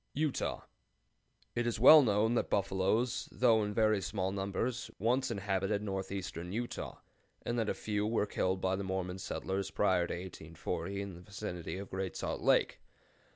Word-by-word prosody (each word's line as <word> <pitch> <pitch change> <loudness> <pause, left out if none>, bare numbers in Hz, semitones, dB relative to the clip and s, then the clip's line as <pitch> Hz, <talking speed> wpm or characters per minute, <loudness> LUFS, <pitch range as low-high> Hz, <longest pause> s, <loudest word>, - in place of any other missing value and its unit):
UTAH. 150 -1 -1 0.9
It 120 0 0
is 115 - -1
well 150 +6 +10
known 110 -2 +2
that 120 - 0
buffaloes, 100 +6 +1
though 115 -3 +4
in 105 - -2
very 110 -1 +3
small 95 0 -2
numbers, 100 +5 -2
once 130 +4 +1
inhabited 100 -1 -1
northeastern 95 -3 -4
Utah, 120 +4 -4 0.5
and 120 0 -1
that 110 - 0
a - - 0
few 105 -1 -1
were 110 -2 +1
killed 95 -2 0
by 95 0 +1
the 100 - -3
Mormon 95 -1 -3
settlers 95 +1 -3
prior 95 -4 +2
to - - -3
1840 85 +1 -5
in 100 -1 -7
the 85 - -11
vicinity 95 -3 -5
of 100 0 -7
Great 95 -3 -3
Salt - - -3
Lake. - - +3
100 Hz, 160 wpm, -33 LUFS, 95-110 Hz, 0.9 s, well